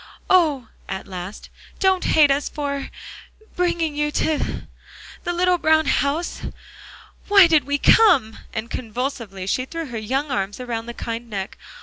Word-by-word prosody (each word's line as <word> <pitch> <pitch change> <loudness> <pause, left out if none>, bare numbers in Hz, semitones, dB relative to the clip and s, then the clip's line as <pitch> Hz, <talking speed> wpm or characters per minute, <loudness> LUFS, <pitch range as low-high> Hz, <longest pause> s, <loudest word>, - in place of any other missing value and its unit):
"Oh!" 305 -10 +3 0.2
at 190 - -4
last, 185 +1 -8 0.3
"don't 380 -1 +2
hate 295 -3 +5
us 285 +1 0
for 280 -2 -4 0.7
bringing 340 -4 0
you 295 0 0
to 315 -2 -1 0.6
the 350 - 0
little 360 0 +2
brown 315 0 +3
house. 285 +5 0 0.9
Why 400 -2 +8
did 315 -5 +3
we 285 +1 0
come!" 285 - +4
And 220 +1 -5
convulsively 230 -5 -4
she 255 +6 -1
threw 330 +4 -5
her 240 -5 -5
young 270 +7 -2
arms 200 -3 -2
around 235 -2 -4
the 235 - -7
kind 230 +1 -5
neck. 195 -3 -5
280 Hz, 145 wpm, -22 LUFS, 230-320 Hz, 0.9 s, Why